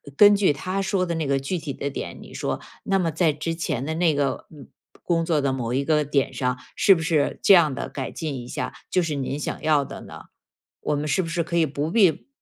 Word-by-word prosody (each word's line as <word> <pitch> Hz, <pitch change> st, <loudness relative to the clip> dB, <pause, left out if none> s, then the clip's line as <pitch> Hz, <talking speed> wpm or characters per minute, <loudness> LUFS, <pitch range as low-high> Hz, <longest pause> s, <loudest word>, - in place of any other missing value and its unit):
根 205 Hz, +4 st, +8 dB
据 190 Hz, -7 st, +3 dB
他 185 Hz, +6 st, -3 dB
说 190 Hz, -2 st, 0 dB
的 170 Hz, -, -2 dB
那 160 Hz, -3 st, -2 dB
个 135 Hz, 0 st, +2 dB
具 150 Hz, +7 st, -2 dB
体 150 Hz, -3 st, -5 dB
的 140 Hz, -, -3 dB
点， 140 Hz, -, -6 dB
你 -, -, -12 dB
说， -, -, -3 dB, 0.2 s
那 195 Hz, 0 st, +1 dB
么 170 Hz, -3 st, 0 dB
在 160 Hz, -1 st, +2 dB
之 155 Hz, +3 st, -3 dB
前 150 Hz, -6 st, -2 dB
的 160 Hz, -, -2 dB
那 165 Hz, -3 st, +2 dB
个 140 Hz, -2 st, -1 dB, 0.6 s
工 165 Hz, -1 st, +1 dB
作 160 Hz, -3 st, +1 dB
的 135 Hz, -, +1 dB
某 125 Hz, -2 st, -2 dB
一 135 Hz, +2 st, +1 dB
个 150 Hz, -1 st, +2 dB
点 140 Hz, -2 st, 0 dB
上， 125 Hz, -2 st, -1 dB, 0.2 s
是 195 Hz, -, +6 dB
不 165 Hz, -, -3 dB
是 160 Hz, -2 st, 0 dB
这 -, -, +7 dB
样 160 Hz, -7 st, +5 dB
地 -, -, -4 dB
改 135 Hz, -2 st, -5 dB
进 155 Hz, -4 st, -4 dB
一 120 Hz, -, -8 dB
下， -, -, -4 dB, 0.2 s
就 180 Hz, -, +2 dB
是 155 Hz, -3 st, -2 dB
您 140 Hz, 0 st, -3 dB
想 150 Hz, -, -4 dB
要 150 Hz, -2 st, +3 dB
的 -, -, -8 dB
呢？ -, -, -10 dB, 0.6 s
我 150 Hz, -, -1 dB
们 145 Hz, +1 st, -2 dB
是 185 Hz, -, +2 dB
不 165 Hz, -, -4 dB
是 165 Hz, 0 st, -1 dB
可 170 Hz, +1 st, -5 dB
以 165 Hz, -, +4 dB
不 150 Hz, +3 st, -3 dB
必 190 Hz, -9 st, +3 dB
155 Hz, 265 characters per minute, -24 LUFS, 140-170 Hz, 0.6 s, 根